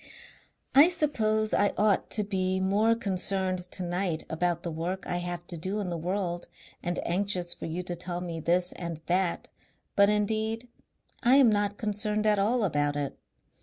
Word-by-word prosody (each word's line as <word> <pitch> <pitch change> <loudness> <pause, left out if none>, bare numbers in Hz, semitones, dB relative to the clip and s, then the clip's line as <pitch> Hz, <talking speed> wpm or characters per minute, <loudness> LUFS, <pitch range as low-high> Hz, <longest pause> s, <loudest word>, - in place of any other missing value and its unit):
"I 285 +4 +8
suppose 220 -11 +1
I 205 - +3
ought 210 -1 +2
to 210 - 0
be 190 -2 0
more 205 +4 +3
concerned 190 -3 -1
tonight 180 -2 -2
about 170 +1 0
the 170 - -3
work 175 +4 -3
I 175 - -1
have 175 -1 -4
to 170 -2 -5
do 190 +5 -2
in 190 -4 -3
the 170 - -2
world 175 0 -2 0.3
and 175 0 -2
anxious 180 -1 0
for 175 - -7
you 170 +3 -3
to 175 -1 -2
tell 175 0 -4
me 170 -2 -5
this 175 +3 +2
and 170 -3 -5
that, 180 0 0 0.5
but 200 0 +6
indeed 220 +3 0 0.5
I 255 +1 +5
am 265 -5 +6
not 205 -1 0
concerned 210 0 -1
at 210 -1 +3
all 225 +4 +2
about 145 -5 +1
it. 145 -1 -3
190 Hz, 170 wpm, -28 LUFS, 175-210 Hz, 0.5 s, I